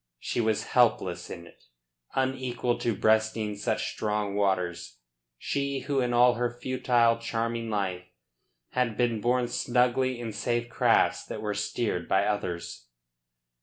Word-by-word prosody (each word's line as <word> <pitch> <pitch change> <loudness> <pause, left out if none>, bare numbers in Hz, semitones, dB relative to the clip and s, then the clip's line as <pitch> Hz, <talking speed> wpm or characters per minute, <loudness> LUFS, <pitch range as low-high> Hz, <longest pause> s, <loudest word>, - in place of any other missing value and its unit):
She 120 - -2
was 110 -2 +1
helpless 110 -7 +2
in 85 -2 -8
it, 85 - -19 0.5
unequal 130 -2 -1
to 115 -3 0
breasting 110 0 +1
such 110 +2 -1
strong 105 -2 -2
waters, 95 -7 -1 0.4
she 140 - -2
who 140 +1 -1
in 125 -1 +1
all 120 +1 +5
her 120 0 0
futile, 120 -2 +2
charming 115 0 -2
life 95 -4 -2 0.7
had 125 -4 0
been 120 -3 +1
borne 125 +1 +2
snugly 125 +1 +1
in 115 -2 -5
safe 120 +2 -1
crafts - - +3
that - - -6
were 105 -1 -1
steered 105 -3 -2
by 95 +1 +3
others. 90 -10 -3
115 Hz, 135 wpm, -28 LUFS, 105-125 Hz, 0.7 s, all